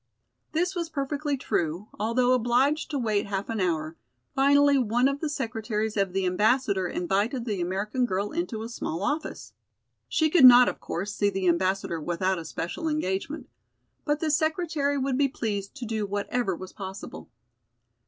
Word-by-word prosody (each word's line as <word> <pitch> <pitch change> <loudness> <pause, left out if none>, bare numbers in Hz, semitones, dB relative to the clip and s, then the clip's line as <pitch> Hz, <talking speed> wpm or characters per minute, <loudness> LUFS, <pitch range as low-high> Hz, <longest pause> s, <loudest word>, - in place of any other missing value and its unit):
This 355 +4 0
was 340 -3 -3
perfectly 290 -1 -2
true, 175 -4 -2
although 245 +4 +2
obliged 255 +5 +2
to 295 - -2
wait 215 -5 0
half 200 +1 -3
an 225 -1 -2
hour; 165 -3 -1 0.4
finally 285 +1 +5
one 245 +2 +2
of 275 +1 -1
the 310 - -2
secretaries 225 -5 -2
of 195 -3 +1
the 190 0 -1
Ambassador 200 0 +2
invited 200 +9 -1
the 205 -6 -2
American 205 +8 -1
girl 200 0 -2
into 305 -10 -3
a - - -5
small 185 -6 -4
office. 300 +6 -3 0.6
She 315 -1 +2
could 335 -5 +5
not, 250 -1 +10
of - - -2
course, 195 +4 -4
see 205 -1 +1
the 190 -2 -2
Ambassador 175 -1 +1
without 185 +3 -1
a 165 - -8
special 170 - -4
engagement, 295 0 -2 0.6
but 295 0 0
the 315 -2 +1
secretary 315 -2 0
would 270 -1 0
be 280 - +4
pleased 205 -5 -4
to 255 -4 -6
do 220 -2 -2
whatever 205 0 -1
was 185 +2 -9
possible. 190 -1 -8
225 Hz, 165 wpm, -27 LUFS, 195-280 Hz, 0.6 s, not